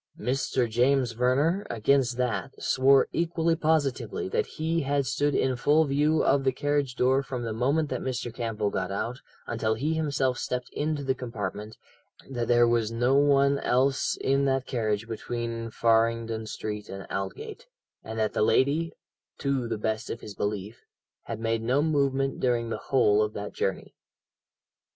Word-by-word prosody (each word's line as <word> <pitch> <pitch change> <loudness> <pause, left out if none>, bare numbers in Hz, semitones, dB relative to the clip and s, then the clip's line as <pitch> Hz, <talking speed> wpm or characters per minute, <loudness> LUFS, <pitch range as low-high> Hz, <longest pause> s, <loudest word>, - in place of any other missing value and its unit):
"Mr. 125 +1 0
James 125 +2 +2
Verner, 135 - +1
against 125 +2 +2
that, 125 +2 -2
swore 135 +1 +4
equally 165 -1 +1
positively 160 - 0
that 450 +2 0
he 165 +1 -1
had 140 -1 0
stood 145 +2 0
in 130 -1 +1
full 150 +5 +3
view 150 +3 +2
of 140 0 +3
the 135 - +3
carriage 145 -1 -1
door 130 +2 +3
from 130 -3 -5
the 115 -1 -3
moment 140 +7 +1
that 130 - -3
Mr. 120 -2 -3
Campbell 110 -3 -2
got 95 0 -2
out 120 +6 -3 0.2
until 110 -1 -1
he 145 +8 -1
himself 140 -5 0
stepped 125 0 -3
into 150 -1 -2
the 135 -1 +1
compartment, 110 -4 -6 0.5
that 120 -3 -3
there 120 0 +5
was 115 -2 +1
no 120 +3 +1
one 140 0 +4
else 135 +2 +1
in 135 +1 +1
that 135 -1 +1
carriage 110 -3 -1
between 115 0 -4
Farringdon 115 0 +1
Street 105 -1 -5
and 95 0 -7
Aldgate, 440 - -5 0.4
and 110 0 -7
that 110 -1 0
the - - 0
lady, 145 +9 +2 0.4
to 135 -3 -1
the 115 - -2
best 110 +2 -2
of - - -5
his 105 - -8
belief, 105 +2 -4 0.4
had 115 - -5
made 115 0 -1
no 130 +6 +1
movement 135 -3 +1
during 120 -2 0
the - - -1
whole 105 -6 +4
of 105 0 -1
that 105 0 -6
journey. 95 - -3
125 Hz, 165 wpm, -27 LUFS, 115-140 Hz, 0.5 s, there